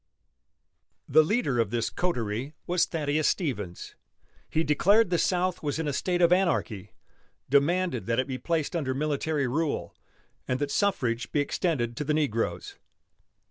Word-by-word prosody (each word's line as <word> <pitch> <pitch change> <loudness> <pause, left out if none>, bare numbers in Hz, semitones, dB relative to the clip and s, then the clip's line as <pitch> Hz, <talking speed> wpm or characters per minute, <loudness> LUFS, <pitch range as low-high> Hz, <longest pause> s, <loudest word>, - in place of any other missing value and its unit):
The 155 +3 +6
leader 155 - 0
of 115 -3 +2
this 115 0 -1
coterie 125 -5 -2
was 175 0 +2
Thaddeus 150 -1 0
Stevens. 105 - -2 0.6
He 160 - +1
declared 190 +7 +3
the 175 - +2
South 180 0 0
was 145 -1 -2
in 160 -1 -2
a 145 - -1
state 175 +4 0
of 170 +1 +6
anarchy, 165 - 0 0.6
demanded 150 -1 +2
that 115 0 0
it 130 - +1
be 130 -2 -5
placed 165 +3 -1
under 135 -6 -1
military 150 0 -1
rule 150 +4 -2 0.5
and 125 - 0
that 145 +1 -2
suffrage 125 - 0
be 150 - +1
extended 145 -5 -1
to 150 - -1
the 150 +1 0
negroes. 125 -8 -2
150 Hz, 150 wpm, -27 LUFS, 130-170 Hz, 0.6 s, The